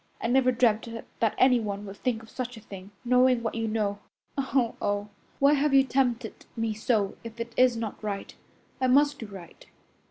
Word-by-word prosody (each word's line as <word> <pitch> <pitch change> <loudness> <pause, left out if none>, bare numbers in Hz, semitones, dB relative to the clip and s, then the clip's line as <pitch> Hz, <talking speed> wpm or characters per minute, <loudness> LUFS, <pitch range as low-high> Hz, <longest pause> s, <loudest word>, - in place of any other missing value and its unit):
I - - -5
never 255 +2 +4
dreamt 235 -2 +2 0.3
that 225 -2 +1
anyone 215 -6 +2
would 200 0 -9
think 235 -3 -2
of 220 - -15
such 245 -2 -5
a - - -8
thing, 195 -2 -10 0.2
knowing 250 0 +4
what 225 - -2
you 225 -1 -2
know. 210 -2 -1 0.4
Oh, 265 -3 0
oh! 205 0 -1 0.3
Why 280 +1 +5
have 290 -1 +2
you 270 - +7
tempted 260 -2 -1
me 225 -2 -1
so 215 -2 0
if 230 0 -9
it 230 0 -5
is 250 -2 +4
not 225 -1 -5
right? 200 -2 -4 0.5
I 260 - +3
must 285 +2 +4
do 225 - -6
right. 190 -4 -12
230 Hz, 190 wpm, -27 LUFS, 210-255 Hz, 0.5 s, you